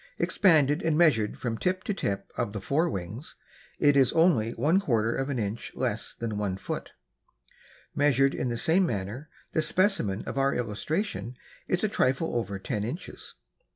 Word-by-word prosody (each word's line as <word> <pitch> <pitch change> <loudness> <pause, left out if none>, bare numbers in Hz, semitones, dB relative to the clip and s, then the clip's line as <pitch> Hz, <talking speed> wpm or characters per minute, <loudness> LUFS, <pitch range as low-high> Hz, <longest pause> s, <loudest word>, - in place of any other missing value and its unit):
Expanded 155 -5 +3
and 160 -2 +1
measured 140 -11 +3
from 115 -2 -3
tip 185 0 0
to 210 - -1
tip 100 - -3
of 120 -4 -2
the 105 - -3
fore 155 - +1
wings, 100 - -6 0.4
it 145 -1 +4
is 135 -3 +4
only 160 -10 +3
one 155 +10 +2
quarter 115 - +1
of 135 +1 -2
inch 115 -4 -3
less 115 -4 -2
than 110 -3 -4
one 95 -3 -2
foot. - - -6 1.0
Measured 135 -1 +3
in 125 - -2
the 120 - -2
same 175 +8 +3
manner, 110 - -4 0.2
the 160 - +1
specimen 165 - +1
of 135 - -3
our 135 0 +2
illustration 125 - -3 0.3
is 180 - 0
a - - +4
trifle 135 - 0
over 110 -4 -2
ten 100 +2 -3
inches. 125 - -7
130 Hz, 165 wpm, -27 LUFS, 110-160 Hz, 1.0 s, it